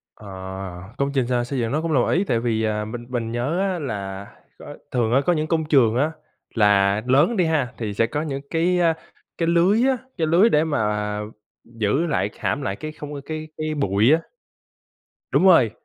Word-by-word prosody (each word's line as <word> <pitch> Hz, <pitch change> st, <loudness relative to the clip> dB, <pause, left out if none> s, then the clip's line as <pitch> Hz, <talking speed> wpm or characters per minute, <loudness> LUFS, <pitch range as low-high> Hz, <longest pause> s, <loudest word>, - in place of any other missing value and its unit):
Ờ, 105 Hz, -, -14 dB, 0.7 s
công 140 Hz, 0 st, 0 dB
trình 130 Hz, -3 st, +1 dB
x 130 Hz, -, -7 dB, 0.2 s
xây 135 Hz, +1 st, -3 dB
dựng 115 Hz, -2 st, -1 dB
nó 150 Hz, -, +1 dB
là 165 Hz, -, -3 dB
một 125 Hz, -, +3 dB
ý. 185 Hz, +4 st, +2 dB
Tại 115 Hz, -10 st, 0 dB
vì, 115 Hz, -2 st, 0 dB
ờ, 105 Hz, -1 st, -1 dB
mình 120 Hz, +2 st, -7 dB
mình 120 Hz, -3 st, -3 dB
nhớ 125 Hz, +9 st, -1 dB
á, 190 Hz, -2 st, 0 dB
là 100 Hz, -, -5 dB, 0.3 s
có -, -, -10 dB, 0.2 s
thường 120 Hz, -2 st, 0 dB
á, 135 Hz, -, +5 dB
có 175 Hz, -, +4 dB
những 155 Hz, -2 st, 0 dB
công 160 Hz, 0 st, 0 dB
trường 130 Hz, -7 st, +3 dB
á, 145 Hz, +5 st, +2 dB, 0.4 s
là 100 Hz, -1 st, +3 dB
lớn 145 Hz, -, +3 dB
đi 185 Hz, -, +3 dB
ha, 150 Hz, -6 st, 0 dB
thì 105 Hz, -3 st, -3 dB
sẽ 115 Hz, +2 st, +2 dB
có 145 Hz, +6 st, -3 dB
những 140 Hz, -3 st, -4 dB
cái, 175 Hz, +2 st, +1 dB
a, 165 Hz, -1 st, +3 dB, 0.4 s
cái 165 Hz, -, 0 dB
lưới 180 Hz, +7 st, +3 dB
á, 265 Hz, -, +2 dB, 0.2 s
cái 160 Hz, -, +1 dB
lưới 175 Hz, +8 st, +5 dB
để 150 Hz, -7 st, +3 dB
mà 105 Hz, -8 st, -1 dB, 0.4 s
giữ 115 Hz, +8 st, -1 dB
lại, 125 Hz, -9 st, 0 dB
hãm 145 Hz, -, -1 dB
lại 95 Hz, -5 st, -2 dB
cái 155 Hz, +5 st, -6 dB
không 150 Hz, -1 st, -9 dB
cái 155 Hz, 0 st, -6 dB
cái 155 Hz, 0 st, -2 dB
bụi 110 Hz, 0 st, +3 dB
á. 160 Hz, -, +5 dB, 1.1 s
Đúng -, -, +3 dB
rồi. 165 Hz, -, +6 dB
135 Hz, 210 wpm, -22 LUFS, 110-160 Hz, 1.1 s, rồi